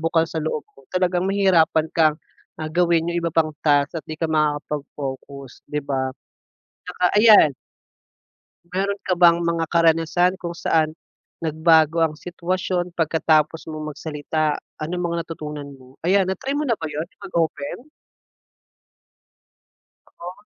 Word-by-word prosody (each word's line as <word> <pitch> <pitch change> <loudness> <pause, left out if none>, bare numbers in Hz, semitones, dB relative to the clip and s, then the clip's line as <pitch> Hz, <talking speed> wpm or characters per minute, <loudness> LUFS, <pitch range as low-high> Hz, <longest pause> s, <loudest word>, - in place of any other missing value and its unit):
bukal 165 0 +2
sa 160 - -3
loob 155 -1 -3
mo, 135 - -19
talagang 180 -1 +1
mahihirapan 175 -5 +3
kang, 155 -2 +4 0.4
ah, 155 - -3
gawin 170 -1 +2
'yong 175 - -1
iba 170 - 0
pang 160 -2 +2
task 145 +2 +3
at 160 - -6
'di 155 - -7
ka 165 - 0
makakapag-focus, 145 -3 -3
'di 150 - -2
ba? 130 -2 -2 0.7
Tsaka - - -6
ayan 210 -7 +8 1.2
Meron 195 +3 -2
ka 185 - +2
bang 170 -1 +5
mga 170 -1 0
karanasan 165 +2 +3
kung 175 -2 -6
saan, 160 -2 +1 0.5
nagbago 160 0 +3
ang 155 -2 -1
sitwasyon 180 0 -2
pagkatapos 160 -1 +1
mong 155 -1 -6
magsalita? 155 0 -2 0.2
Ano 155 +3 -4
mga 170 -1 -2
natutunan 150 -3 -7
mo? 130 +1 -18
Ayan 190 +2 +3
na-try 260 +9 -3
mo 290 +1 -1
na 235 - +2
ba 165 - -12
'yon,' 155 +3 -4
yong - - -20
mag-open? 160 -4 -1 2.3
Oo. 180 +4 -11
165 Hz, 135 wpm, -22 LUFS, 155-175 Hz, 2.3 s, ayan